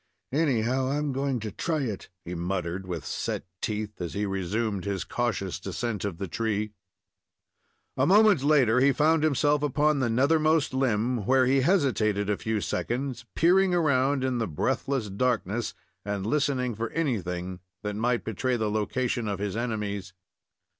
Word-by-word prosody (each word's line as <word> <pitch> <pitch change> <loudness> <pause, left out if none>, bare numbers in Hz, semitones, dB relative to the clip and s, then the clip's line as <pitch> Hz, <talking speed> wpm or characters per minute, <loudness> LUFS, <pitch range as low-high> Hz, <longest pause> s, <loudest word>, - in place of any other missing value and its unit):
"Anyhow, 130 -3 +1
I 135 - 0
am 150 -1 -1
going 135 -1 -1
to 110 -1 -4
try 155 - -1
it," 110 -7 -4 0.2
he 90 - -5
muttered, 90 +1 -3
with 85 -5 -4
set - - -3 0.2
teeth, 105 -2 -3
as 85 - -4
he 105 +1 0
resumed 100 +1 -2
his 100 -2 -2
cautious 105 -6 -2
descent 115 -5 -3
of 95 -5 -3
the 95 +1 -4
tree. 105 +2 -2 1.2
A - - +2
moment 205 -4 +6
later 135 -5 +4
he 135 +1 +5
found 155 +2 +3
himself 145 -1 +2
upon 150 +1 +2
the 130 -3 +1
nethermost 155 +5 +3
limb, 120 -3 0
where 130 0 +5
he 135 +1 +3
hesitated 115 - +2
a 100 - 0
few 110 -2 -1
seconds, 125 +2 -2
peering 180 +2 +4
around 140 -4 +2
in 130 -2 0
the 115 - 0
breathless 130 - -1
darkness 110 +1 -1 0.3
and 100 -1 -3
listening 130 -1 +1
for 115 +1 -3
anything 95 - -2 0.2
that 105 -1 -3
might 120 +2 0
betray 120 +4 -1
the 110 -2 -1
location 120 +2 -1
of 100 -1 -1
his 100 0 -3
enemies. 105 -5 -3
120 Hz, 160 wpm, -27 LUFS, 105-140 Hz, 1.2 s, moment